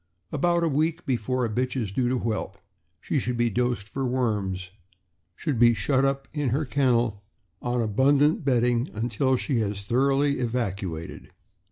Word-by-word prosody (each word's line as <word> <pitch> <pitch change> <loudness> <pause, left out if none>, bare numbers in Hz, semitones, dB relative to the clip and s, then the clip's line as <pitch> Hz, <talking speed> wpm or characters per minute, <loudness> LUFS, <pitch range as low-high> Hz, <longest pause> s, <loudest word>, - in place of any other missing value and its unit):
About 170 +3 +1
a - - +3
week 160 +3 0
before 130 -1 0
a - - 0
bitch 125 +3 -1
is 105 -5 -3
due 120 +4 0
to 130 - +1
whelp, 110 -4 -3 0.4
she 145 - -1
should 125 -1 -2
be 120 -1 +2
dosed 120 -2 -1
for 135 +5 -4
worms; 105 -8 -1 0.6
should 140 - -2
then 120 - +7
be - - +3
shut 130 +6 +1 0.3
uj)inher 145 -1 0
kennel, 120 -6 +1 0.4
on 120 -1 0
abundant 140 - +3
bedding, 120 -1 +2
until 120 +4 +1
she 125 -1 -1
has 100 -2 -2
thoroughly 135 +5 +2
evacuated. 100 -9 -3
125 Hz, 155 wpm, -26 LUFS, 110-135 Hz, 0.6 s, then